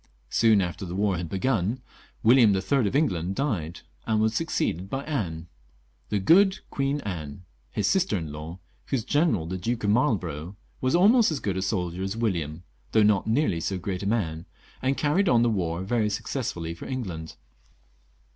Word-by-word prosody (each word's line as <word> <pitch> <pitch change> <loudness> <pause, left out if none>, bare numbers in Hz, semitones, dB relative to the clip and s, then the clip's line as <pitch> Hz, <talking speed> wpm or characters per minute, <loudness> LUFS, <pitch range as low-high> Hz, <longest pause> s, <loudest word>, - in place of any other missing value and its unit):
Soon 110 -3 +4
after 90 +2 -4
the 90 -1 -5
war 100 -1 +1
had 85 -1 -4
begun 105 +3 0 0.4
William 115 -4 +6
III. 120 +5 +1
of 115 - -2
England 95 - +1
died, 90 - -2 0.3
and 110 -1 +2
was 110 0 +2
succeeded 95 - -1
by 135 +3 -3
Anne 90 - -3 0.3
— - - -39
"the - - +1
good 190 - +5
Queen 140 +1 -1
Anne" 85 - -6
— - - -39
his 105 - +1
sister 185 - +2
in 80 -4 -5
law, 75 +4 -7 0.3
whose 130 -5 -1
general, 145 - +2
the 90 +3 -4
Duke 115 +5 -2
of 105 - +2
Marlborough, 95 - 0 0.3
was 130 +3 +2
almost 215 +6 +5
as 155 - -2
good 100 -3 -2
a 95 - -1
soldier 90 -2 -2
as 95 +3 -3
William, 85 -8 -2 0.3
though 110 - +5
a - - +5
far 105 -2 +3
less 110 - +1
great 95 +1 -3
man, 90 -6 -1 0.3
and 135 +1 0
carried 165 +6 +2
on 120 -1 +4
the 120 - +3
war 85 -3 -1
very 110 +1 +1
successfully 105 -7 -3
for 85 - -9
England. 90 -12 -5
100 Hz, 180 wpm, -26 LUFS, 85-130 Hz, 0.4 s, William